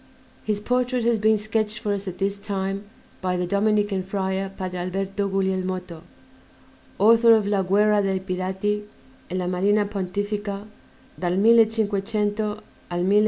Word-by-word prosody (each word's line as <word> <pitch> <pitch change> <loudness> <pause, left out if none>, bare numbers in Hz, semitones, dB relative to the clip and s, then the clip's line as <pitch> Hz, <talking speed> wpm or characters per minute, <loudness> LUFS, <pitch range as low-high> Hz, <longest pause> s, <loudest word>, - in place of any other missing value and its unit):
His 210 -1 -1
portrait 250 +2 0
has 230 -1 +2
been 215 +1 +4
sketched 215 0 -1
for 210 -1 -1
us 200 0 -4
at 185 -1 -5
this 200 +1 -1
time 195 0 -3 0.4
by 180 -1 0
the 180 - -1
Dominican 205 +1 +1
Friar, 190 0 -2
Padre 185 -2 -5
Alberto 195 +2 -2
Guglielmotto, 185 -3 -2 1.0
author 230 +2 +6
of 215 -2 +1
"La 200 -1 +1
guerra 205 +2 +3
dei 195 -1 0
Pirati 190 +3 -2 0.5
e 180 - -4
la 185 -1 -1
marina 200 +4 +2
Pontifica 205 +1 -3 0.5
dal 180 0 0
1500 215 -1 +3 0.5
al 175 0 -1
1560." 190 +2 +2
200 Hz, 140 wpm, -24 LUFS, 190-210 Hz, 1.0 s, author